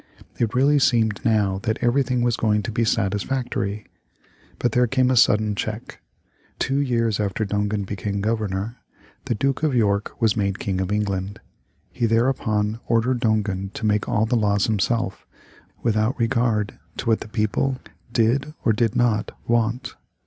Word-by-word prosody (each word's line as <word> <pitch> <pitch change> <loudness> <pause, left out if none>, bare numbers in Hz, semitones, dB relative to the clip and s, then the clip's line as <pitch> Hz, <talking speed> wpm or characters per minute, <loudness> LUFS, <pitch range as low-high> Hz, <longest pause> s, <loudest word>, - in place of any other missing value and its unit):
It 115 0 0
really 140 +3 +4
seemed 110 -6 +2
now 105 -4 +2
that 110 +1 -1
everything 125 0 +1
was 120 -1 +2
going 105 -2 +1
to 105 - -4
be 115 +1 0
satisfactory. 105 0 -1 0.7
But 120 - 0
there 125 +2 +3
came 130 +1 +2
a - - +2
sudden 105 -2 +4
check. 110 +2 -5 0.6
Two 135 +1 0
years 115 -6 +1
after 105 +1 -1
Dongan 105 0 -1
became 100 +1 -3
Governor, 105 +1 -2 0.5
the 125 -4 -1
Duke 135 +4 0
of 155 -4 +1
York 100 -3 0
was 110 -3 +2
made 100 -2 0
King 95 -2 -2
of 95 +1 -2
England. 100 -1 -2 0.5
He 120 -2 0
thereupon 110 -2 +1
ordered 120 +2 +2
Dongan 105 -4 0
to 110 - -4
make 105 -1 +1
all 110 - +2
the 120 +2 0
laws 105 -2 +2
himself, 110 -1 -1 0.6
without 110 +1 +1
regard 115 -3 0 0.2
to - - -4
what 115 -2 +2
the - - -8
people 115 +4 0 0.3
did 130 +7 +1
or 115 - +4
did 115 +1 0
not 120 -4 +1
want. 120 +2 0
110 Hz, 155 wpm, -23 LUFS, 105-120 Hz, 0.7 s, really